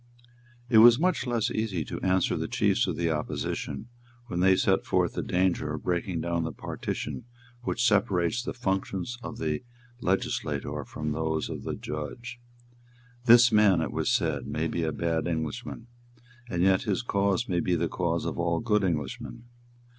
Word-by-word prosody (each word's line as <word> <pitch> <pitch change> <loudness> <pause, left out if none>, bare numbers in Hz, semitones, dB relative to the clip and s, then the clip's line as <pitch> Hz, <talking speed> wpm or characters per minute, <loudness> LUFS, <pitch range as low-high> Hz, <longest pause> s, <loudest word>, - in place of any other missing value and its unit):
It 115 -3 +6
was 120 +1 +9
much 175 -4 +1
less 120 -3 0
easy 100 -8 -2
to - - -6
answer 95 0 +2
the - - -2
chiefs - - +2
of - - -1
the 85 -1 0
opposition 75 +7 -3 0.4
when 90 -8 -4
they 95 +1 +5
set - - +2
forth - - +1
the - - -2
danger 90 -4 0
of 75 - -8
breaking 90 -1 -1
down 85 0 -1
the 80 - -2
partition 125 - -5 0.4
which 120 0 -1
separates 100 0 +2
the - - -4
functions 95 0 -2
of - - -7
the 75 -1 -2 0.4
legislator 95 -4 -1
from 75 0 -4
those 80 0 -1
of - - -5
the - - -2
judge. 120 +12 -6 0.9
"This 120 0 +8
man," 105 -5 +5
it 80 - -2
was - - 0
said, - - 0
"may 80 +2 -2
be 85 - -2
a 80 -1 0
bad 80 +2 -1
Englishman; 80 +6 -4 0.6
and 90 -4 0
yet 95 0 +4
his 105 -1 -1
cause 100 0 +1
may 90 -2 0
be 90 0 +1
the 85 0 0
cause 85 -1 -1
of - - -3
all 85 -1 +1
good 105 -3 +1
Englishmen. 80 - -3
90 Hz, 170 wpm, -28 LUFS, 80-110 Hz, 0.9 s, was